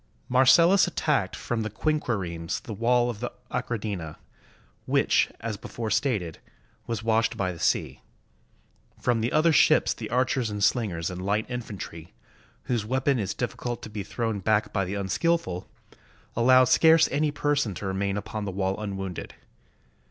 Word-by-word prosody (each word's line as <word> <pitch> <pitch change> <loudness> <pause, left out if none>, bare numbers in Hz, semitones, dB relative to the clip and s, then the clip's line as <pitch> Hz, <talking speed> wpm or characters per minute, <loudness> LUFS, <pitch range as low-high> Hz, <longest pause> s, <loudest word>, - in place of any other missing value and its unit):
Marcellus 165 +10 +6
attacked 150 - 0
from 120 -2 -3
the 110 - -2
quinquiremes 100 - -2
the 110 - -6
wall 120 +3 +2
of 105 - -10
the 120 - -4 0.2
Achradina, 100 -9 -3 0.7
which, - - +3
as 110 -2 -3
before 110 +2 -5
stated, 105 - 0 0.5
was 115 -2 -3
washed 115 0 +1
by 95 -2 0
the 85 - -10
sea. - - 0 1.0
From 120 -2 +1
the 115 - -1
other 155 +2 +4
ships - - +4
the - - -7
archers 125 0 +1
and 105 -1 -3
slingers 95 -8 +1
and 90 0 -6
light 105 +3 0
infantry, 100 - -7 0.5
whose 120 - -1
weapon 130 +3 +1
is 100 -4 -2
difficult 120 -1 -4
to 110 - -8
be 105 -1 -4
thrown 110 +1 -3
back 105 +2 +1
by 100 -1 0
the 95 +3 -4
unskillful, 100 - -1 0.7
allowed 130 +2 +6
scarce 160 +4 +5
any 150 +2 +1
person 145 -7 0
to 105 - -6
remain 100 +1 -1
upon 105 0 -5
the - - -3
wall 95 +1 -1
unwounded. 95 -3 -5
110 Hz, 150 wpm, -26 LUFS, 100-125 Hz, 1.0 s, Marcellus